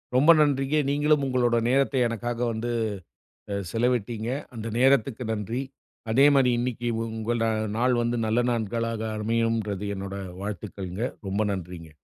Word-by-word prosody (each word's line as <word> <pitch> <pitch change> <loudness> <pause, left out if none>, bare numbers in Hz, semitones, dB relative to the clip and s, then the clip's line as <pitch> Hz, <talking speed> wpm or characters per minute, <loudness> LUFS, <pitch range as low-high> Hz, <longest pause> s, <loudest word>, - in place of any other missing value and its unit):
ரொம்ப 145 +6 +7
நன்றிங்க. 140 -1 +2
நீங்களும் 145 0 +2
உங்களோட 120 -2 +2
நேரத்தை 135 0 +2
எனக்காக 120 +1 -3
வந்து 115 +2 -3 0.8
அ - - -1 0.2
செலவிட்டீங்க. 115 -1 0 0.3
அந்த 115 0 -5
நேரத்துக்கு 130 -2 +3
நன்றி. 110 +4 -3 0.5
அதே 135 +5 +5
மாரி 130 -2 +4
இன்னைக்கி 120 -1 -2 0.3
உங்க 110 +1 -1 0.4
நாள் 125 +1 +3
வந்து 120 +1 0
நல்ல 110 +2 +2
நாட்களாக 115 0 -2 0.2
அமையும்ன்றது 110 -2 -1
என்னோட 95 0 -5 0.2
வாழ்த்துக்கள்ங்க. 100 0 -4 0.2
ரொம்ப 100 +3 +1
நன்றிங்க. 85 -4 -8
115 Hz, 125 wpm, -26 LUFS, 105-125 Hz, 0.8 s, ரொம்ப